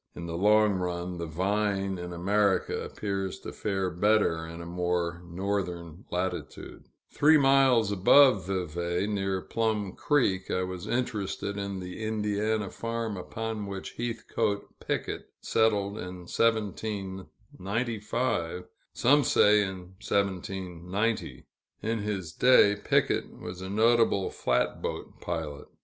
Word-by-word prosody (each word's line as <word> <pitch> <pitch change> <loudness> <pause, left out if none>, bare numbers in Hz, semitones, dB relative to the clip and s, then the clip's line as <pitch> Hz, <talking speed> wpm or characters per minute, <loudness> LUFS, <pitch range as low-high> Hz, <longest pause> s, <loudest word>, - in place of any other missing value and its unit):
In 85 - -6
the 85 -1 -4
long 105 +3 +4
run, 90 0 -3
the 85 - -3
vine 95 +2 0
in 90 0 -6
America 100 +3 +1
appears 95 -2 -3
to - - -7
fare 95 -3 -1
better 90 -3 +2
in 85 +1 -8
a 85 - -7
more 90 0 -1
northern 90 -2 -3
latitude. 90 0 -4 0.2
Three 155 +2 +5
miles 135 -6 +4
above 100 +1 +6
Vevay, 85 -1 -1
near 95 -2 -1
Plum 110 -3 -1
Creek, 100 -11 +1
I 90 - 0
was 90 -1 -5
interested 100 -5 -2
in 100 -1 -4
the 90 +4 -7
Indiana 105 -1 -1
farm 115 -2 -3
upon 110 +2 -4
which 100 -1 -6
Heathcoat 115 -3 -2
Picket - - -3
settled 105 -2 +1
in 90 0 -7
1795 105 0 -2 0.3
some 145 +4 +4
say 105 -3 +5
in 95 -2 -2 0.3
1790. 95 +2 -2 0.4
In 115 +1 0
his 100 -5 -3
day, 125 -3 +6
Picket 105 - 0
was 90 +1 -7
a 95 - -5
notable 110 -1 +3
flatboat 60 0 -2
pilot. 80 -4 -4
100 Hz, 120 wpm, -28 LUFS, 90-110 Hz, 0.4 s, above